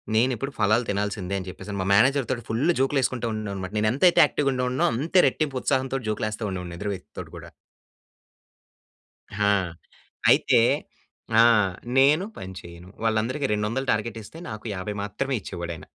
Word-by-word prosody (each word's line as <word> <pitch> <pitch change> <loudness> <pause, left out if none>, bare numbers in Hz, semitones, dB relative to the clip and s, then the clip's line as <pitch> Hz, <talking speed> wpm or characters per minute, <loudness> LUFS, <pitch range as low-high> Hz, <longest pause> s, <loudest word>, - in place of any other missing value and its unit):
నేను 120 +4 +3
ఇప్పుడు 135 +5 -4
ఫలాలు 110 +4 +3
తినాల్సిందే 100 -1 -2
అని 95 - -8
చెప్పేసి, 95 - -10
అని 100 - -3
మా 95 - -2
మేనేజర్ 135 +4 +3
తోటి 120 -2 -3
ఫుల్ 115 +4 -1 0.2
జోక్‌లు 135 +1 +2
వేసుకుంటూ 125 -2 -1
ఉండే 110 - -3
వాణ్ని 100 -2 -4
అన్నమాట. 95 0 -5
నేను 110 0 +2
ఎంతైతే 175 +7 +5
యాక్టివ్‌గా 140 -1 0
ఉండేవాడినో, 125 0 0
అంతే 165 +8 +2
రెట్టింపు 135 0 -1
ఉత్సాహంతో 135 -1 0
జోక్‌లు 110 0 -1
వేస్తూ 110 +1 -6
ఉండేవాడిని 90 -2 -6
ఎదురు 105 +1 -2
వ్యక్తి 90 - -14
తోటి - - -8
కూడా. - - -10 2.0
ఆ! - - +5 0.8
అయితే - - +5 0.8
ఆ! - - +8 0.5
నేను 150 +7 +5
పని 95 0 -7
చేయను. 85 +1 -12 0.2
వాళ్ళందరికి, 115 +6 0
200 105 +6 -1
టార్గెట్ 110 +1 -2
ఇస్తే, 160 - -12
నాకు 110 +1 -8
50 95 +3 -4
మాత్రమే 130 +6 -2
ఇచ్చేవాడు 85 -2 -5
ఆయన. - - -12
110 Hz, 170 wpm, -25 LUFS, 100-135 Hz, 2.0 s, ఆ